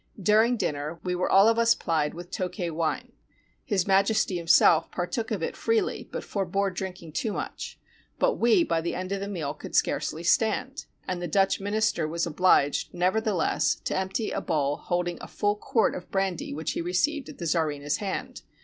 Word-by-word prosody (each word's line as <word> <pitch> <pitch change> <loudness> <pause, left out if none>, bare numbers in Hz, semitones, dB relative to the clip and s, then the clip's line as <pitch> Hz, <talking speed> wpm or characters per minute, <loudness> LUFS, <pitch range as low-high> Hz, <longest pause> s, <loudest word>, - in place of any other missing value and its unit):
During 220 +5 +4
dinner 150 -1 -3
we 180 - -1
were 180 0 0
all 195 +2 +7
of 230 0 +3
us 230 0 +5
plied 155 -3 -1
with 175 +1 -9
Tokay 180 -2 -3
wine. 160 0 -2 0.5
His 190 -3 0
Majesty 195 0 +2
himself 165 -1 +4
partook 180 +6 -3
of - - -2
it - - -3
freely, 445 -3 -1
but - - -4
forbore 195 0 -1
drinking 180 -3 -6
too 215 +8 -2
much; - - -6 0.4
but - - +2
we 235 +8 +4
by 165 - 0
the 170 - -3
end 185 +1 -4
of 200 - -1
the 200 - -4
meal 160 -8 -3
could - - -9
scarcely 160 - 0
stand, 240 - +1 0.2
and 180 -1 -3
the 175 - -2
Dutch 195 0 +2
minister 205 -4 0
was 170 +2 -1
obliged, 165 -3 +2
nevertheless, 180 -6 +1
to - - -2
empty 190 +3 -2
a - - -2
bowl 145 -2 0
holding 175 -1 -2
a - - -7
full 205 0 0
quart 220 +2 +1
of 180 - -8
brandy 195 -3 -1
which 155 +3 -3
he - - -3
received 265 - 0
at - - -10
the 170 - -5
czarina's 150 -3 0
hand. 195 -2 -4
185 Hz, 185 wpm, -27 LUFS, 165-210 Hz, 0.5 s, all